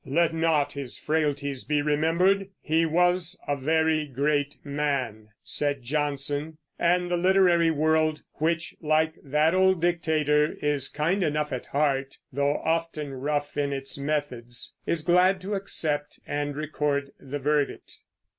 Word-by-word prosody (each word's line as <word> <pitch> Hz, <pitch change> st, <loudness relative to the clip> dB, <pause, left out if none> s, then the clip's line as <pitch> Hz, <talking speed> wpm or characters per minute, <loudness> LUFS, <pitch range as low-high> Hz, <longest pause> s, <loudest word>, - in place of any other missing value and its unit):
"Let 165 Hz, +4 st, +1 dB
not 160 Hz, -3 st, +1 dB
his 140 Hz, -3 st, -6 dB
frailties 145 Hz, -3 st, -1 dB
be 150 Hz, -1 st, 0 dB
remembered; 170 Hz, +6 st, +2 dB
he 165 Hz, +2 st, +1 dB
was 175 Hz, +1 st, +1 dB
a 145 Hz, -, +1 dB
very 155 Hz, +2 st, +1 dB
great 145 Hz, +2 st, 0 dB
man," 140 Hz, -7 st, -2 dB, 0.2 s
said 145 Hz, -3 st, -2 dB
Johnson; 145 Hz, +2 st, -2 dB, 0.2 s
and 175 Hz, +1 st, +2 dB
the 175 Hz, -, +2 dB
literary 180 Hz, -2 st, +4 dB
world 155 Hz, 0 st, +1 dB, 0.2 s
which, 165 Hz, +2 st, 0 dB
like 155 Hz, 0 st, +2 dB
that 150 Hz, +3 st, +2 dB
old 190 Hz, -1 st, +4 dB
dictator, 155 Hz, -3 st, +2 dB
is 145 Hz, -3 st, 0 dB
kind 170 Hz, +7 st, 0 dB
enough 150 Hz, -2 st, 0 dB
at 125 Hz, -, -5 dB
heart, 140 Hz, -2 st, 0 dB, 0.2 s
though 140 Hz, +2 st, +1 dB
often 160 Hz, -3 st, -1 dB
rough 145 Hz, +2 st, -2 dB
in 145 Hz, -1 st, 0 dB
its 135 Hz, 0 st, -3 dB
methods 140 Hz, -5 st, -3 dB
is 160 Hz, -2 st, 0 dB
glad 180 Hz, +3 st, +4 dB
to 195 Hz, +3 st, -4 dB
accept 155 Hz, -7 st, -2 dB
and 145 Hz, -1 st, -2 dB
record 145 Hz, -2 st, -1 dB
the 140 Hz, +2 st, -5 dB
verdict. 145 Hz, 0 st, -1 dB
150 Hz, 135 wpm, -26 LUFS, 145-165 Hz, 0.2 s, literary